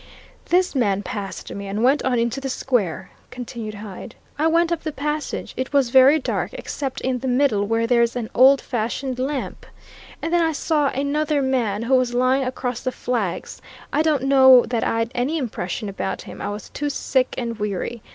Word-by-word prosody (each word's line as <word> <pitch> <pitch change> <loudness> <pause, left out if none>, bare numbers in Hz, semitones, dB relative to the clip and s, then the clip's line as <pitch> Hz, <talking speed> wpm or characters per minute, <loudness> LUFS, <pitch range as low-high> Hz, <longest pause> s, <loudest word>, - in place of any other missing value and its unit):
"This 365 +1 +2
man 205 -7 +1
passed 205 -5 -6
me 200 0 -6
and 205 +3 -2
went 270 +4 +4
on 255 -2 +1
into 235 +3 -1
the 270 - -3
square," 245 -10 -1 0.2
continued 235 -3 -7
Hyde. 205 -2 -9 0.2
"I 315 - +3
went 335 +1 +2
up 335 -1 -1
the 310 - -3
passage. 300 +1 -3
It 260 +2 -4
was 270 -4 +3
very 265 +4 +7
dark, 295 - -2
except 270 -2 -5
in 255 -1 -1
the 265 - -4
middle, 245 -6 +2
where 225 +1 +1
there's 235 0 +2
an 240 -3 -3
old 265 +2 +6
fashioned 250 +2 -3
lamp. 270 +1 -3 0.6
And 330 - -3
then 345 - +4
I 325 -1 +1
saw 300 -1 +1
another 285 +2 0
man, 235 -5 0
who 245 +3 0
was 250 -2 +2
lying 255 +2 +2
across 250 -1 -3
the 255 - -2
flags. 230 -7 -3 0.3
I 305 - +3
don't 305 -4 +1
know 265 -2 +7
that 235 -2 0
I'd 230 +1 0
any 255 +6 -1
impression 215 - -4
about 195 -1 -4
him - - -10
I - - -3
was 205 0 -7
too 290 0 -3
sick 260 -2 0
and 235 -3 -4
weary. 210 +3 -3
255 Hz, 190 wpm, -22 LUFS, 230-280 Hz, 0.6 s, very